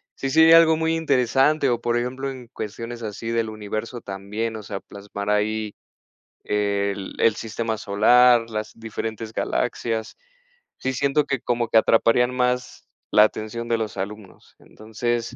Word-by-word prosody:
sí 135 - -3
sería 160 +3 +7
algo 160 -1 +5
muy 160 0 0
interesante 140 -1 +2
o, 120 0 -1
por 120 0 0
ejemplo, 130 +3 -3
en 130 -3 -9
cuestiones 115 +3 -7
así 110 +1 -5
del 115 -1 0
universo 110 +3 -5
también, 105 +4 -4
o 110 - -6
sea, 100 -2 -6
plasmar 100 0 -6
ahí 105 0 0 0.7
el 100 -1 -1
el 110 -2 +4
sistema 115 0 -3
solar, 115 +3 +4
las 110 0 -4
diferentes 110 0 -6
galaxias. 110 -1 -2 0.6
Sí, 130 0 -2
siento 140 +2 +1
que 135 -4 -1
como 120 -1 -1
que 115 - +4
atraparían 120 +3 +3
más 125 0 -1 0.2
la 105 - +7
atención 110 +2 -2
de 115 -1 +1
los 110 -3 -4
alumnos, 100 0 -8
entonces, 115 +2 -4
115 Hz, 150 wpm, -23 LUFS, 105-125 Hz, 0.7 s, sería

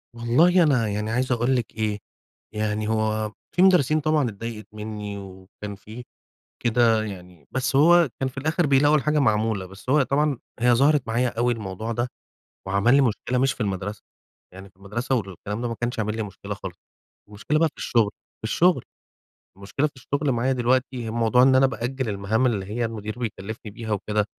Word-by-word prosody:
والله 165 +10 +4
أنا 125 -8 +2
يعني 105 +2 -2
عايز 125 +2 0
أقول 125 +2 +2
لِك 120 -3 -2
إيه، 105 -1 -1 0.6
يعني 105 0 -1
هو 110 -1 0 0.2
في 180 - +3
مدرسين 155 -6 +5
طبعًا 150 -5 +2
اتضايقِت 110 +1 -7
منِّي 105 -1 -6
وكان 100 +1 -9
في 110 +5 -10 0.6
كده 115 -2 +3
يعني، 90 -6 -10
بس 130 +1 -1
هو 170 +1 +6
كان 135 - +1
في 135 - -9
الآخِر 155 +4 +1
بيلاقوا 145 +2 +4
الحاجة 150 +1 +1
معمولة. 110 -5 +1
بس 95 +7 -9
هو 150 0 +5
طبعًا، 140 0 +1 0.2
هي 120 0 +4
ظهرِت 140 +2 +4
معايا 120 +2 +1
أوي 120 +1 +3
الموضوع 110 +1 -4
ده 120 +2 -1 0.6
وعمل 100 +6 +3
لي - - +6
مشكلة 125 +1 0
مش 135 0 +2
في 125 - -15
المدرسة، 100 0 -3 0.5
يعني 95 +1 -11
في - - -42
المدرسة 120 +7 -3
والكلام 105 +1 -4
ده 120 - -1
ما 115 - -4
كانش 120 -1 -2
عامل 105 0 -1
لي 110 - -1
مشكلة 100 0 -6
خالص. 95 -2 -8 0.5
المشكلة 110 +9 -1
بقى 165 0 +3
في - - -20
الشغل 110 -4 +2 0.3
في - - -18
الشغل، 160 +4 +2 0.7
المشكلة 120 +9 -1
في - - -14
الشغل 140 +2 -1
معايا 125 +2 +1
دلوقتي، 125 -1 0
الموضوع 115 +2 +3
إن 130 0 +5
أنا 135 +1 +6
بأجَل 125 +1 -3
المهام 105 +5 0
اللي 105 -6 0
هي 115 +4 -2
المدير 110 0 -5
بيكلّفني 110 -2 -5
بيها 110 +1 -7
وكده، 105 +1 0
115 Hz, 180 wpm, -24 LUFS, 105-130 Hz, 0.7 s, هو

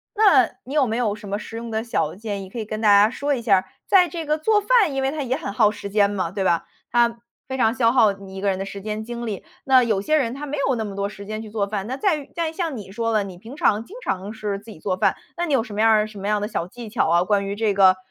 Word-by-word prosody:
那 395 - +5
你 265 - -8
有 285 -5 +3
没 220 - -1
有 230 -4 +1
什 210 0 -10
么 200 +1 -2
实 225 +1 -8
用 230 0 -6
的 220 0 -1
小 170 -9 -1
建 205 -1 -5
议 190 - -10
可 220 - -9
以 225 - -2
跟 215 0 -5
大 220 - +1
家 205 +1 +7
说 285 +4 -1
一 245 - -4
下 220 -4 +4
儿， 185 - -2 0.2
在 370 -3 +5
这 335 -2 -5
个 305 +1 +1
做 415 +6 +2
饭 415 - +3
因 270 - -1
为 265 0 +1
它 305 0 -4
也 255 0 -1
很 270 - -5
耗 210 0 +4
时 205 -1 -7
间 200 0 +3
嘛， 185 -4 -2
对 195 -1 -2
吧？ 170 -2 +2 0.2
它 235 -1 +2 0.3
非 265 - -3
常 225 -3 +3
消 230 -3 +3
耗 225 -5 +4
你 195 -1 -12
一 - - -5
个 200 - +1
人 190 - 0
的 195 - -3
时 195 0 -7
间 215 +1 -4
精 240 +1 -6
力。 205 -4 -4 0.2
那 260 -2 +6
有 220 -4 +1
些 305 +11 +1
人 255 -6 +1
他 280 +3 -6
没 295 +1 -4
有 265 - +2
那 220 -2 -2
么 200 -2 -6
多 200 0 -2
时 200 -1 -10
间 215 +1 -5
去 220 - -9
做 205 -2 -1
饭。 200 -1 -3
那 255 +4 -4
在 385 0 +2
于 290 -2 -9
在 335 -2 -1
于 - - -10
像 325 -6 -3
你 200 -3 -9
说 230 0 -1
的， 215 -2 +2
你 185 -3 -9
平 230 +9 -11
常 215 -6 +2
经 405 - -12
常 195 +2 -2
是 210 -2 -3
自 210 +3 -12
己 180 - -12
做 185 +2 -1
饭， 185 - +1 0.2
那 345 - -1
你 305 - -1
有 250 -4 +3
什 215 - -9
么 210 - -1
样 225 - +5
儿 215 -1 +3
什 215 -1 -12
么 195 +1 -4
样 210 - +2
儿 - - -3
的 210 - -1
小 210 - -3
技 235 +4 -9
巧 210 -6 +1
啊， 170 +1 +4
关 200 +1 +1
于 200 - -3
这 215 -1 +1
个， 190 -1 +6
220 Hz, 350 characters per minute, -23 LUFS, 200-260 Hz, 0.3 s, 家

